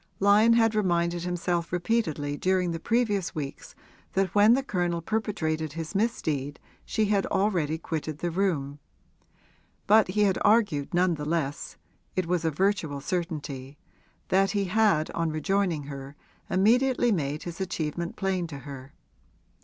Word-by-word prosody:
Lyon 210 Hz, +3 st, +5 dB
had 225 Hz, -1 st, +4 dB
reminded 175 Hz, -4 st, +1 dB
himself 175 Hz, -1 st, -1 dB
repeatedly 170 Hz, -6 st, -1 dB
during 185 Hz, +2 st, +1 dB
the 165 Hz, -, -4 dB
previous 210 Hz, -5 st, 0 dB
weeks 140 Hz, -3 st, -6 dB, 0.4 s
that 190 Hz, -1 st, 0 dB
when 210 Hz, +3 st, +6 dB
the 270 Hz, -, 0 dB
Colonel 175 Hz, -7 st, -1 dB
perpetrated 160 Hz, -6 st, -2 dB
his 165 Hz, +1 st, -5 dB
misdeed 155 Hz, -, -1 dB, 0.2 s
she 220 Hz, -2 st, 0 dB
had 200 Hz, -1 st, +1 dB
already 175 Hz, -6 st, 0 dB
quitted 160 Hz, -2 st, -4 dB
the 175 Hz, +2 st, -2 dB
room; 155 Hz, -6 st, -1 dB, 1.1 s
but 215 Hz, +1 st, +5 dB
he 200 Hz, +3 st, 0 dB
had 195 Hz, -2 st, +2 dB
argued 205 Hz, -10 st, +2 dB
none 175 Hz, 0 st, +2 dB
the 150 Hz, -2 st, -5 dB
less 150 Hz, -2 st, -2 dB, 0.4 s
it 185 Hz, -, 0 dB
was 175 Hz, 0 st, 0 dB
a 165 Hz, -, +2 dB
virtual 160 Hz, -3 st, 0 dB
certainty 145 Hz, -4 st, -4 dB, 0.5 s
that 195 Hz, +1 st, +3 dB
he 200 Hz, -2 st, 0 dB
had 190 Hz, -5 st, +2 dB
on 165 Hz, -1 st, -1 dB
rejoining 165 Hz, +1 st, 0 dB
her 140 Hz, 0 st, -8 dB, 0.3 s
immediately 240 Hz, +5 st, +3 dB
made 150 Hz, -5 st, -1 dB
his 175 Hz, +1 st, -6 dB
achievement 170 Hz, -2 st, -3 dB
plain 190 Hz, -3 st, -1 dB
to 145 Hz, -3 st, -8 dB
her. 135 Hz, 0 st, -10 dB
175 Hz, 145 wpm, -27 LUFS, 155-200 Hz, 1.1 s, when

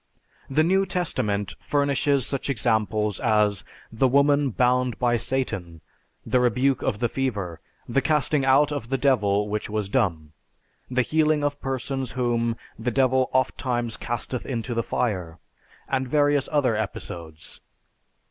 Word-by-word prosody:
The 150 Hz, +4 st, +3 dB
New 190 Hz, +3 st, +2 dB
Testament 105 Hz, -, -2 dB
furnishes 140 Hz, -2 st, +1 dB
such 140 Hz, 0 st, -3 dB
examples 110 Hz, -4 st, 0 dB
as 105 Hz, -5 st, +2 dB, 0.3 s
the 115 Hz, +4 st, +2 dB
woman 140 Hz, +1 st, +3 dB
"bound 125 Hz, +1 st, +1 dB
by 120 Hz, -1 st, +2 dB
Satan," 105 Hz, -9 st, -3 dB, 0.5 s
the 125 Hz, -, +2 dB
rebuke 125 Hz, +2 st, +2 dB
of 105 Hz, -, -1 dB
the 120 Hz, +2 st, +1 dB
fever, 105 Hz, -11 st, -3 dB, 0.3 s
the 130 Hz, +3 st, +1 dB
casting 150 Hz, 0 st, +1 dB
out 135 Hz, +3 st, +4 dB
of 135 Hz, -6 st, -4 dB
the 135 Hz, -, +1 dB
devil 105 Hz, -7 st, +2 dB
which 105 Hz, +1 st, -3 dB
was 105 Hz, -2 st, -2 dB
dumb, 85 Hz, -, 0 dB, 0.6 s
the 130 Hz, 0 st, +2 dB
healing 155 Hz, +1 st, +2 dB
of 145 Hz, 0 st, -1 dB
persons 135 Hz, -1 st, -3 dB
whom 120 Hz, -2 st, 0 dB, 0.2 s
"the 120 Hz, +2 st, -1 dB
devil 130 Hz, +1 st, +2 dB
oftimes 125 Hz, -2 st, 0 dB
casteth 120 Hz, +1 st, -4 dB
into 120 Hz, -2 st, -3 dB
the 115 Hz, -, +1 dB
fire," 90 Hz, -10 st, -2 dB, 0.5 s
and 130 Hz, -1 st, -1 dB
various 145 Hz, 0 st, +2 dB
other 140 Hz, -6 st, +2 dB
episodes. 85 Hz, -6 st, -6 dB
125 Hz, 140 wpm, -25 LUFS, 110-135 Hz, 0.6 s, out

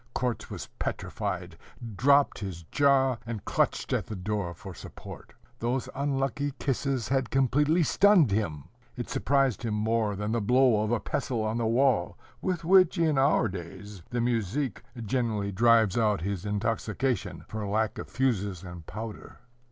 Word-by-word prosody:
Korzh 125 Hz, -2 st, -2 dB
was -, -, -6 dB
petrified, 90 Hz, -5 st, -4 dB, 0.4 s
dropped 140 Hz, +6 st, +4 dB
his 95 Hz, -5 st, -6 dB
jaw, 135 Hz, -3 st, +3 dB
and 115 Hz, -3 st, -6 dB
clutched -, -, 0 dB
at -, -, -1 dB
the 110 Hz, -, -5 dB
door 95 Hz, -2 st, -3 dB
for 95 Hz, +2 st, -9 dB
support. -, -, -11 dB, 0.2 s
Those 120 Hz, +2 st, -1 dB
unlucky 140 Hz, 0 st, -1 dB
kisses 135 Hz, -3 st, -1 dB
had 135 Hz, -3 st, +1 dB
completely 145 Hz, +6 st, +3 dB
stunned 185 Hz, -, +5 dB
him. 80 Hz, -9 st, -1 dB, 0.3 s
It 120 Hz, -, -6 dB
surprised 135 Hz, -3 st, +1 dB
him 115 Hz, -3 st, -2 dB
more 110 Hz, -1 st, 0 dB
than 105 Hz, +2 st, -3 dB
the 115 Hz, 0 st, 0 dB
blow 125 Hz, 0 st, +4 dB
of 110 Hz, +1 st, -1 dB
a 120 Hz, -, +2 dB
pestle 115 Hz, -4 st, -2 dB
on 110 Hz, +1 st, -1 dB
the 115 Hz, -, 0 dB
wall, 125 Hz, +1 st, +2 dB, 0.2 s
with 180 Hz, -2 st, -2 dB
which, 185 Hz, -1 st, +5 dB
in 160 Hz, -4 st, +2 dB
our 135 Hz, -3 st, +3 dB
days, 95 Hz, +1 st, -8 dB
the 120 Hz, -1 st, -1 dB
muzhik 120 Hz, +3 st, -1 dB, 0.2 s
generally 110 Hz, -3 st, -1 dB
drives 115 Hz, -1 st, +4 dB
out 105 Hz, -4 st, +2 dB
his 100 Hz, +1 st, -3 dB
intoxication 115 Hz, +4 st, -2 dB
for 110 Hz, -1 st, -5 dB
lack 110 Hz, +2 st, 0 dB
of -, -, -7 dB
fuses 105 Hz, -8 st, -1 dB
and 90 Hz, -3 st, -9 dB
powder. 110 Hz, -1 st, -7 dB
115 Hz, 155 wpm, -28 LUFS, 105-135 Hz, 0.4 s, stunned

